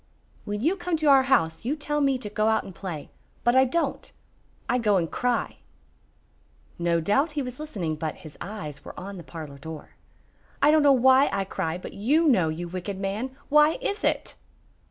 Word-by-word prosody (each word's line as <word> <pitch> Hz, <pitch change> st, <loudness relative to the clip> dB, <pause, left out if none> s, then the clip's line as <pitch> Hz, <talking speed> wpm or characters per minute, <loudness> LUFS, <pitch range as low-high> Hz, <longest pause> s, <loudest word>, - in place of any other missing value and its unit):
"When 205 Hz, 0 st, -3 dB
you 330 Hz, +9 st, +2 dB
come 350 Hz, -2 st, -1 dB
to 310 Hz, -, -3 dB
our 275 Hz, -2 st, +7 dB
house 165 Hz, -11 st, +2 dB
you 265 Hz, +6 st, -1 dB
tell 295 Hz, 0 st, -2 dB
me 275 Hz, -2 st, +2 dB
to 245 Hz, -5 st, -6 dB
go 215 Hz, +1 st, +1 dB
out 220 Hz, -, +2 dB
and 190 Hz, -, -10 dB
play. 170 Hz, -6 st, -7 dB, 0.3 s
But 240 Hz, +1 st, +3 dB
I 260 Hz, 0 st, +6 dB
don't. 335 Hz, +7 st, -2 dB, 0.6 s
I 250 Hz, -, +1 dB
go 210 Hz, -4 st, +3 dB
and 165 Hz, -3 st, -1 dB
cry." 245 Hz, -2 st, -1 dB, 1.2 s
No 170 Hz, -1 st, +2 dB
doubt 275 Hz, -, +1 dB
he 290 Hz, -2 st, -1 dB
was 250 Hz, +1 st, -7 dB
listening, 185 Hz, -, -3 dB
but 155 Hz, -1 st, -3 dB
his 155 Hz, -, -10 dB
eyes 155 Hz, -9 st, -7 dB
were -, -, -9 dB
on 195 Hz, +2 st, -7 dB
the 175 Hz, -, -9 dB
parlor 150 Hz, -3 st, -9 dB
door. 160 Hz, +1 st, -8 dB, 0.7 s
"I 290 Hz, +2 st, +5 dB
don't 310 Hz, 0 st, +5 dB
know 290 Hz, -1 st, +6 dB
why 265 Hz, +1 st, +5 dB
I 195 Hz, 0 st, 0 dB
cry, 175 Hz, -3 st, -3 dB
but 180 Hz, -, -9 dB
you 295 Hz, +11 st, +2 dB
know, 185 Hz, -, +4 dB
you 170 Hz, +3 st, -4 dB
wicked 185 Hz, +2 st, -5 dB
man! 215 Hz, +7 st, -3 dB
Why 300 Hz, +1 st, +6 dB
is 420 Hz, -4 st, -3 dB
it?" -, -, 0 dB
220 Hz, 195 wpm, -26 LUFS, 175-280 Hz, 1.2 s, our